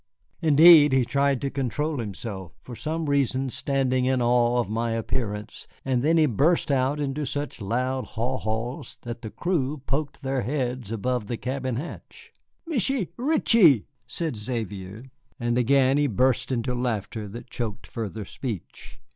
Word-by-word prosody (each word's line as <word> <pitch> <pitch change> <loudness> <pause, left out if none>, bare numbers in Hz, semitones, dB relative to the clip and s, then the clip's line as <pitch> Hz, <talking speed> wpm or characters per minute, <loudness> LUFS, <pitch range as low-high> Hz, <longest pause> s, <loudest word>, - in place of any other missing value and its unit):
Indeed, 155 -2 +8
he 130 -2 +3
tried 140 +1 +1
to 140 - -2
control 140 +3 -2
himself, 100 -4 -6
for 125 - -8
some 160 +4 -3
reason 135 -2 +1
standing 130 -2 0
in 130 0 +2
awe 120 0 +3
of 120 - 0
my 115 +2 -1
appearance, 110 -2 -4 0.2
and 130 -2 +1
then 160 +5 +3
he 160 - +5
burst 150 - +2
out 135 +2 +1
into 145 +1 -2
such 145 -2 -4
loud 130 +5 -1
haw 125 +3 -1
haws 110 +4 -4
that 120 -1 -6
the 110 - -6
crew 155 - -1
poked 140 +2 -3
their 135 -1 0
heads 125 -2 -2
above 115 0 -1
the 120 - -3
cabin 130 0 -3
hatch. 460 - -8 0.3
"Michié 265 - 0
Reetchie," 230 - +4 0.2
said 160 -9 -3
Xavier, 105 -2 -5 0.4
and 120 0 0
again 135 +2 +4
he 145 - +3
burst 130 +2 +1
into 125 0 -1
laughter 110 -3 -2
that 120 +5 -10
choked 110 -2 -4
further 110 -2 -5
speech. 110 -4 -7
130 Hz, 155 wpm, -25 LUFS, 115-140 Hz, 0.4 s, Indeed